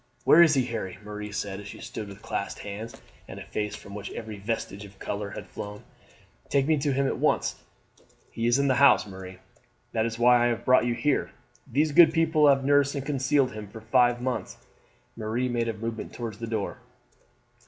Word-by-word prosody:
"Where 165 - +7
is 160 -3 +6
he, 130 -2 +2
Harry?" 110 -7 -5
Marie 105 0 -6
said 100 -1 -4
as 105 - -9
she - - -9
stood 110 -2 -6
with 100 -1 -12
clasped - - -4
hands, 105 +3 -7 0.3
and - - -8
a - - -7
face 105 -1 -3
from 100 - -11
which 100 0 -6
every 110 -2 -7
vestige 105 -1 -4
of 100 -1 -13
colour 100 +1 -4
had - - -8
flown. 105 0 -8 0.7
"Take 140 -1 +2
me 155 +1 +3
to 145 0 0
him 135 +1 +1
at - - -1
once." - - +1 0.7
"He 115 0 -1
is 120 +2 +4
in 140 0 +2
the 130 - +4
house, 140 -5 +6
Marie; 95 -2 -9 0.5
that 110 0 +1
is 115 0 -5
why 120 0 +5
I - - +4
have 120 -2 -2
brought 130 -1 +5
you 120 - 0
here. 135 +5 0 0.4
These 150 +5 +2
good 165 +3 +7
people 160 -2 +4
have 135 -1 +4
nursed 145 0 +3
and 140 -1 -4
concealed 140 -1 +1
him 105 -1 -7
for 105 +3 -10
five 120 +2 +3
months." 125 0 -3 0.6
Marie 115 +3 -2
made 120 -1 -1
a 115 - -1
movement 115 +1 -5
towards 115 -3 -6
the 115 - -5
door. 110 -3 -3
115 Hz, 205 wpm, -27 LUFS, 105-135 Hz, 0.7 s, Where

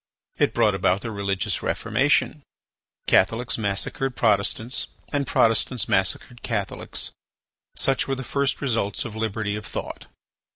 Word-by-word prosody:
It - - +2
brought - - +4
about 95 +2 +2
the 115 - -4
religious 100 -3 -1
Reformation; - - +1 0.6
Catholics 115 +6 +3
massacred 110 +5 -1
Protestants 110 +3 +1 0.3
and 140 -2 0
Protestants 115 0 +2
massacred 95 +5 0
Catholics. 105 -4 -3 0.6
Such 135 -2 +2
were 135 - 0
the 130 - -5
first 140 +2 0
results 115 -7 0
of 110 -2 -6
liberty 110 -1 -1
of 105 - -5
thought. - - -6
110 Hz, 125 wpm, -24 LUFS, 100-125 Hz, 0.6 s, brought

